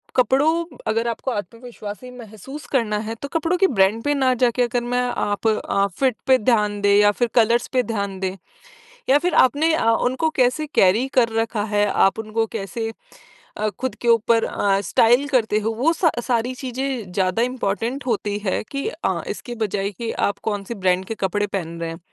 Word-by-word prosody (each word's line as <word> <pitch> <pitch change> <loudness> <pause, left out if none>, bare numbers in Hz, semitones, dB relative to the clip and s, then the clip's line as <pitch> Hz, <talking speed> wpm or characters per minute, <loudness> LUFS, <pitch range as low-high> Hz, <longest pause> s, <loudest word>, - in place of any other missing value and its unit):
कपड़ों 295 +7 +2 0.2
अगर 225 +2 0
आपको 235 +3 -3
आत्मविश्वासी 230 +2 -7
महसूस 235 +6 -10
करना 230 -6 +1
है 225 - -4
तो 280 - -4
कपड़ों 330 +2 +1
के 385 +1 +4
ब्रांड 210 - +2
पे 290 - +1
ना 260 -2 +2
जाके 245 0 +2
अगर 240 0 -1
मैं 250 - +2
आप 225 -3 -1
अ, 200 -2 +1
फिट 260 -4 +2
पे 260 - +6
ध्यान 210 -3 +1
दें 200 0 +4
या 205 0 +5
फिर 240 +3 0
कलर्स 235 +1 +3
पर 255 - +4
ध्यान 200 -3 -3
दें 190 0 -2 0.7
या 275 - +6
फिर 355 +2 -1
आपने 310 +5 +1
अ, 230 - +1
उनको 260 +7 +1
कैसे 250 +5 +2
कैरी 205 +8 +4
कर 230 - +3
रखा 225 -2 -2
है 205 0 +4 0.2
आप 195 - -3
उनको 220 +1 -1
कैसे 225 +3 -4 0.7
अ, 215 0 0
खुद 260 0 -3
के 240 - -3
ऊपर 230 0 +4
अ, 195 -1 +1
स्टाइल 240 +8 +3
करते 225 -6 +2
हो 220 +1 -1
वो 290 +8 +2
सा 330 -1 +2 0.2
सारी 245 +1 0
चीज़ें 255 -6 -3
ज़्यादा 185 +3 0
इम्पोर्टेंट 245 +1 -2
होती 205 -3 -1
है 190 - 0
कि 275 0 -3
अ, - - -2
इसके 240 -2 -6
बजाए 200 0 -2
कि 230 +3 -5 0.2
आप - - -22
कौन-सी 205 0 -3
ब्रांड 185 -1 +1
के 225 - -5
कपड़े 205 +2 0
पहन 170 -4 -5
रहे 165 - -2
हैं। 165 - -7
230 Hz, 190 wpm, -22 LUFS, 205-255 Hz, 0.7 s, पे